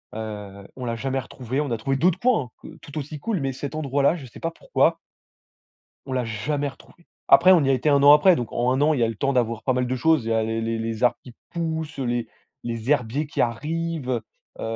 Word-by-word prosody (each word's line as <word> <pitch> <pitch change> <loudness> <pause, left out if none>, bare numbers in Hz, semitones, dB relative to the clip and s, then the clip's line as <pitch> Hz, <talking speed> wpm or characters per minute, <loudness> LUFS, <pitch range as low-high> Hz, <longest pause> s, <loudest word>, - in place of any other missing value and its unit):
Heu, 105 -3 -7
on 130 - -6
l'a 115 -1 -2
jamais 135 +3 -2
retrouvé, 130 +1 -4
on 145 - -3
a 115 - -1
trouvé 135 +5 -1
d'autres 180 +5 +2
coins 220 - +1
hein, - - -9
q 160 +1 -14
tout 145 0 -10
aussi 150 +1 -5
cools. 210 +4 -2
Mais 135 -2 -2
cet 140 +3 -6
endroit 140 -2 -1
là, 140 +4 +4
je 150 -6 -8
sais 120 - -13
pas 165 - -2
pourquoi - - +1 1.1
on 130 - -6
l'a 125 -2 0
jamais 140 +7 -2
retrouvé. 170 +5 -16 0.2
Après, 185 +2 +8
on 170 -5 +5
y 135 - +2
a - - +5
été 130 +3 +1
1 140 -1 +4
an 145 +1 +9
après, 170 +4 +6
donc 120 -2 -4
en 120 +1 +1
1 130 - 0
an, 155 +2 +4
il 135 - -1
y - - +3
a - - +4
eu - - -1
le 115 - -7
temps 135 +5 0
d'avoir 115 -3 0
pas 130 - +1
mal 125 0 0
de 130 - -1
choses. 155 -1 +2
Il 115 - -3
y - - +2
a, 110 0 +2
l - - -2
le 115 0 -1
les 115 0 -2
les 115 +1 -2
arbres 125 - +3
qui 125 - -13 0.2
poussent 160 -2 -3
heu, 135 - -2
les 120 -1 -1 0.4
les, 115 +1 -3
herbiers 140 +1 +1
qui 145 - -4
arrivent 155 +4 -2 0.5
heu, - - -7
135 Hz, 270 wpm, -24 LUFS, 115-155 Hz, 1.1 s, an